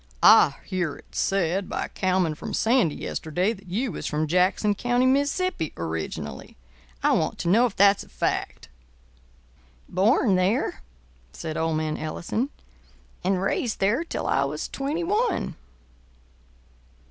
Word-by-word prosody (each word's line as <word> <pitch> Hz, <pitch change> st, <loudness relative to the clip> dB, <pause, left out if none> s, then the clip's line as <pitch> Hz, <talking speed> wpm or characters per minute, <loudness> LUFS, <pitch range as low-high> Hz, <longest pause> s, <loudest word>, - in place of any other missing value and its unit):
I -, -, +7 dB
hear 175 Hz, -6 st, -2 dB
it -, -, -18 dB
said 195 Hz, 0 st, 0 dB
by -, -, -2 dB
a -, -, -10 dB
cowman 185 Hz, -4 st, 0 dB
from 150 Hz, -, -5 dB
Sandy 225 Hz, -, +2 dB
yesterday 180 Hz, +7 st, -1 dB
that 195 Hz, -3 st, -15 dB
you 220 Hz, +7 st, -1 dB
was -, -, -5 dB
from 155 Hz, +1 st, 0 dB
Jackson 185 Hz, +5 st, +2 dB
County, 245 Hz, +4 st, +1 dB
Mississippi, 285 Hz, -, +1 dB
originally. 80 Hz, -5 st, -5 dB, 0.5 s
I -, -, +4 dB
want -, -, +1 dB
to -, -, -4 dB
know 225 Hz, +8 st, +5 dB
if 215 Hz, -, -9 dB
that's 200 Hz, 0 st, +5 dB
a -, -, -18 dB
fact." -, -, -2 dB, 1.2 s
"Born 205 Hz, +3 st, +3 dB
there," 190 Hz, +7 st, 0 dB, 0.5 s
said 160 Hz, -2 st, -5 dB
old 160 Hz, -1 st, 0 dB
man 155 Hz, -1 st, -2 dB
Ellison, 175 Hz, -, -3 dB, 0.7 s
"and 185 Hz, 0 st, +1 dB
raised 220 Hz, +3 st, -1 dB
there 210 Hz, +11 st, +2 dB
till 335 Hz, -, -4 dB
I 135 Hz, -, +2 dB
was 150 Hz, +2 st, -3 dB
twenty 290 Hz, +5 st, -3 dB
one." 415 Hz, -, 0 dB
195 Hz, 140 wpm, -25 LUFS, 160-245 Hz, 1.2 s, I